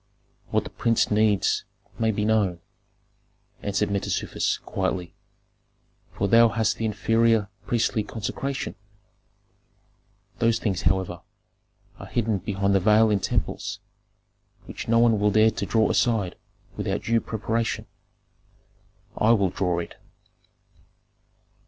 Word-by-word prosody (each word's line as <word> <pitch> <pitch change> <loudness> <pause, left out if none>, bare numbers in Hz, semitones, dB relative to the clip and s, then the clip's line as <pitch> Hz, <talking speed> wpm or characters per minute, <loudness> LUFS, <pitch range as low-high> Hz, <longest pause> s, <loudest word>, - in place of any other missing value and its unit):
"What - - +1
the - - -9
prince 115 -2 +1
needs 105 -1 +2 0.4
may 110 -1 +2
be 105 -1 0
known," 105 -5 +1 1.0
answered 100 0 -1
Mentezufis, 100 -1 -1
quietly, 90 -3 -2 1.0
"for 100 - -1
thou 115 +3 +6
hast 110 0 0
the 115 - -2
inferior 110 0 +2 0.2
priestly 115 -2 +1
consecration. 115 +6 -4 1.7
Those 115 -1 +3
things, 95 -5 -2
however, 90 -1 0 0.8
are - - -9
hidden 110 -4 0
behind 100 +1 -1
the 95 - +4
veil 110 +3 +4
in 100 - +2
temples, - - -2 0.9
which - - -7
no 115 +1 +3
one 115 -2 +4
will 105 +1 +3
dare 110 +2 +4
to - - -4
draw 110 -1 +3
aside 110 -7 +1 0.4
without - - -2
due 115 0 +2
preparation." 115 +1 -2 1.3
"I 110 +2 +4
will 100 -4 +2
draw 90 -2 -1
it." 85 - -5
110 Hz, 115 wpm, -25 LUFS, 100-115 Hz, 1.7 s, thou